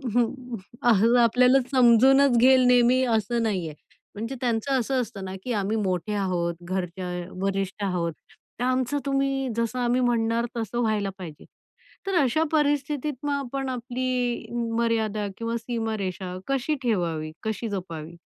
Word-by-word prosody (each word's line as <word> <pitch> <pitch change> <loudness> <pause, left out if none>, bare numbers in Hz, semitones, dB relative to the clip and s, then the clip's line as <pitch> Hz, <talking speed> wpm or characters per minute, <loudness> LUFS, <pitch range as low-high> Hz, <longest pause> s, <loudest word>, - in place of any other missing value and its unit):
हं, 245 0 -1 0.2
अ 240 -1 +5 0.3
आपल्याला 250 +3 +5
समजूनच 260 +1 +5
घेईल 255 +1 +6
नेहमी 250 +1 +5
असं 230 +2 -1
नाही 190 -7 -1
आहे. 150 - -11 0.4
म्हणजे 230 +6 -4
त्यांचं 250 +2 +1
असं 255 +2 0
असतं 195 -4 -6
ना, 190 0 -6
की 250 - -2
आम्ही 210 +1 0
मोठे 185 +2 -1
आहोत, 180 -4 -1
घरच्या 180 0 -4 0.2
अ, - - -9 0.2
वरिष्ठ 195 +1 -2
आहोत 175 -4 -1 0.5
तर - - -1
आमचं 255 +2 +1
तुम्ही 275 -1 0
जसं 230 +2 -1
आम्ही 245 +1 +1
म्हणणार 235 -1 +1
तसं 230 +1 -3
व्हायला 215 -3 0
पाहिजे. 165 -5 -9 0.6
तर 390 - 0
अशा 280 +5 +2
परिस्थितीत 295 -1 0
मग 290 - -1
आपण 270 -1 -3
आपली 250 0 -2 0.3
मर्यादा 220 -3 0
किंवा 230 0 -3
सीमारेषा 215 -6 -4
कशी 275 +3 0
ठेवावी? 170 -9 -1
कशी 220 +1 -3
जपावी? 170 -4 -6
230 Hz, 145 wpm, -25 LUFS, 195-255 Hz, 0.6 s, घेईल